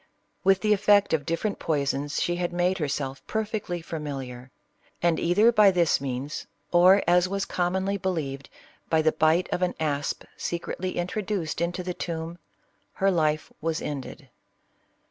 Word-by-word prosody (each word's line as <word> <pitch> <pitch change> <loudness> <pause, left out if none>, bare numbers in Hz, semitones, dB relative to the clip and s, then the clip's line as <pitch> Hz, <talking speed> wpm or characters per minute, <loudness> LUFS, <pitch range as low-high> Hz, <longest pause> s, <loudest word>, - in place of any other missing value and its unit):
With 195 0 +4
the 215 -1 +4
effect 205 -1 +4
of 145 -3 0
different 185 +6 -1
poisons 145 -1 -1
she 175 0 0
had 175 -1 -1
made 180 +2 +1
herself 140 -3 -2
perfectly 210 -6 -3
familiar; 135 -6 -6 0.5
and 170 -2 +2
either 205 +7 +4
by 210 -3 +6
this 175 -6 +2
means, 135 +2 -4 0.2
or, 185 +3 +6
as 180 +1 +4
was 195 0 -1
commonly 190 +3 0
believed, 155 -8 -3 0.4
by 160 -1 +3
the 155 - +4
bite 160 +4 +2
of 180 - -1
an 180 - 0
asp 145 -2 -1
secretly 175 +2 -4
introduced 185 -2 -2
into 175 +2 -1
the 180 0 -3
tomb, 165 0 -5 0.5
her 195 0 +2
life 155 -3 0
was 165 0 -1
ended. 140 -3 -6
175 Hz, 145 wpm, -26 LUFS, 155-190 Hz, 0.5 s, by